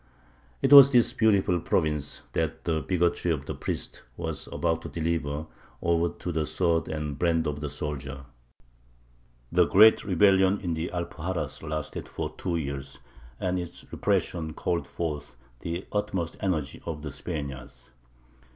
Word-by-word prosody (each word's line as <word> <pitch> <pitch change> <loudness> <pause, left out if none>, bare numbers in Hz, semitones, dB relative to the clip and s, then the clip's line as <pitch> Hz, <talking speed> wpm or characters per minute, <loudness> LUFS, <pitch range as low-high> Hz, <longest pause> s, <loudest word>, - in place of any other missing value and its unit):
" 65 -1 -32
It - - +5
was 140 -1 +11
this 120 -3 +4
beautiful 100 -5 +3
province 75 -3 -1
that 80 0 -1
the 80 -2 0
bigotry 85 +3 +1
of 70 -4 -2
the - - -4
priest - - -5 0.2
was 80 -3 -4
about 80 0 0
to - - -7
deliver 80 -2 -2 0.3
over 85 0 +2
to 90 - -6
the 80 -2 -1
sword 80 +1 +1
and 75 -3 -4
brand 85 -2 +2
of 75 -1 -3
the 75 - -3
soldier. 70 -2 -5 1.3
The 90 0 +4
great 110 +3 +7
rebellion 95 +1 +4
in 90 -4 -1
the 80 +1 -2
Alpuxarras 85 -4 -4
lasted 75 -1 -4
for - - -4
two 90 -2 -2
years, 70 -2 -5 0.4
and 90 0 0
its 85 -1 -7
repression 80 -2 -1
called 85 -1 -1
forth 75 -6 -4 0.2
the 85 +6 -4
utmost 95 -5 -2
energy 80 -8 -2
of 75 -3 -5
the 75 - -5
Spaniards. 70 -6 -7
80 Hz, 150 wpm, -27 LUFS, 75-90 Hz, 1.3 s, was